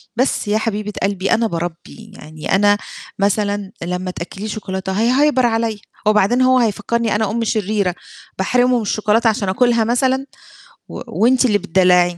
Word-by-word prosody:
بس 255 -3 0
يا 210 +1 +2
حبيبة 210 -1 -3
قلبي 195 -1 -1
أنا 230 0 +2
باربِّي 175 +5 -6
يعني 155 +4 -3
أنا 205 +1 +4 0.4
مثلًا 200 0 0
لما 180 +1 -3
تأكليه 190 +4 -7
شوكولاتة 190 -3 -4
هيهيبر 255 +5 +2
عليّا، 225 -2 0 0.3
وبعدين 215 +4 +3
هو 255 0 +4
هيفكرني 225 0 0
أنا 210 -1 0
أم 230 +1 -1
شريرة 205 -4 -1 0.4
باحرمه 245 +6 +2
من 235 - -1
الشوكولاتة 215 +2 +1
عشان 205 -3 -1
أُكلها 235 +3 +2
مثلًا 260 +3 +1 0.6
و - - -7
وأنتِ 255 +3 +2
اللي 210 -4 +3
بتدلعي 180 -2 +2
210 Hz, 150 wpm, -18 LUFS, 190-235 Hz, 0.6 s, أنا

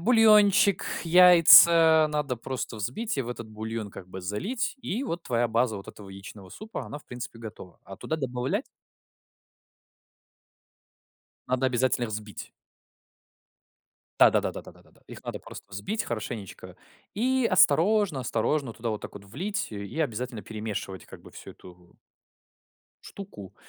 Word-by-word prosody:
Бульончик, 210 -2 +5 0.2
яйца 165 -2 +7
надо 150 -4 -2
просто 120 -1 -5
взбить 130 - -4
и - - +1
в 120 - -8
этот 115 -2 -7
бульон 110 0 -6
как 90 -1 -11
бы 95 +1 -8
залить, 195 - -3
и 230 +3 -3
вот 175 -9 -4
твоя 120 -1 0
база 115 -1 0
вот 100 - -10
этого 100 -2 -12
яичного 95 0 -11
супа, 215 - -8
она 145 - -7
в - - -21
принципе 120 -1 -8
готова. 110 -5 -11
А 95 - -10
туда 160 - -4
добавлять 125 -3 -2 2.8
Надо 130 +1 0
обязательно 125 -1 +1
их 115 - -5
взбить. 105 -1 -7 1.7
Да-да-да, - - +4
да, - - -7
да, - - -13
да, - - -21
да. - - -27
Их - - -12
надо - - -5
просто - - -11
взбить 195 - -3
хорошенечко 110 -3 -7 0.4
и 255 +3 +1
осторожно 185 -1 +3
осторожно 120 +2 -1
туда 115 0 -4
вот 110 - -4
так - - -9
вот 100 -1 -11
влить 185 - -4
и 100 +7 -7
обязательно 125 -5 -3
перемешивать 105 -3 -6
как - - -13
бы - - -14
всю - - -11
эту 90 -1 -17 1.1
штуку, 145 - -11
125 Hz, 145 wpm, -26 LUFS, 105-175 Hz, 2.8 s, яйца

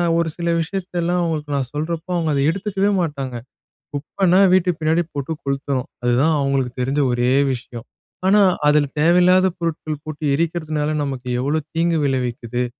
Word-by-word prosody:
நான் 170 -1 +2
ஒரு 170 - 0
சில 170 0 -2
விஷயத்தலாம் 180 -1 -2
அவங்களுக்கு 155 -3 -2
நான் 130 -2 -2
சொல்றப்போ, 160 +3 -3
அவங்க 160 -2 0
அத 140 - +1
எடுத்துக்கவே 195 +2 -1
மாட்டாங்க. 140 -6 -4 0.6
"குப்பன்னா 180 +6 +2
வீட்டுக்கு 180 -3 +1
பின்னாடி 160 +2 +2
போட்டு 140 +2 -3
கொளுத்தணும்" 140 -1 -2 0.2
அதுதான் 130 +7 +3
அவங்களுக்கு 135 -3 0
தெரிஞ்ச 135 +3 -1
ஒரே 120 +1 +1 0.2
விஷயம். 120 0 -9 0.4
ஆனா, 205 +1 +5 0.3
அதில 150 -1 +3
தேவையில்லாத 180 +3 +5
பொருட்கள் 155 -3 -3
போட்டு 155 0 -7
எரிக்கிறதுனால, 155 -2 -1
நமக்கு 130 -2 -5
எவ்வளோ 145 +5 0
தீங்கு 165 0 +1
விளைவிக்குது. 125 -2 -2
155 Hz, 145 wpm, -20 LUFS, 135-170 Hz, 0.6 s, ஆனா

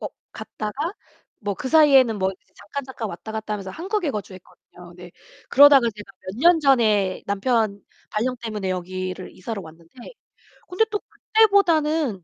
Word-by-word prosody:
어 - - -4 0.3
갔다가 275 - -5 0.5
뭐 205 -1 -3
그 260 - -5
사이에는 270 -7 +5
뭐 190 0 +1
이제 190 - -17
잠깐, 205 +8 -7
잠깐 255 -4 -6
왔다갔다 220 +4 -6
하면서 195 -2 -6
한국에 365 - -2
거주했거든요. 185 -4 -10
근데 175 0 -13 0.4
그러다가 275 -3 +7
제가 210 -1 -12
몇 185 - -6
년 335 +3 +5
전에 215 -9 +2
남편 205 0 0 0.3
발령 250 +4 -1
때문에 210 -4 -4
여기를 185 +1 -5
이사를 205 +2 -6
왔는데 165 0 -15 0.8
근데 375 +5 +2
또 415 - -2
그때보다는 325 - +2
220 Hz, 340 characters per minute, -22 LUFS, 190-290 Hz, 0.8 s, 그러다가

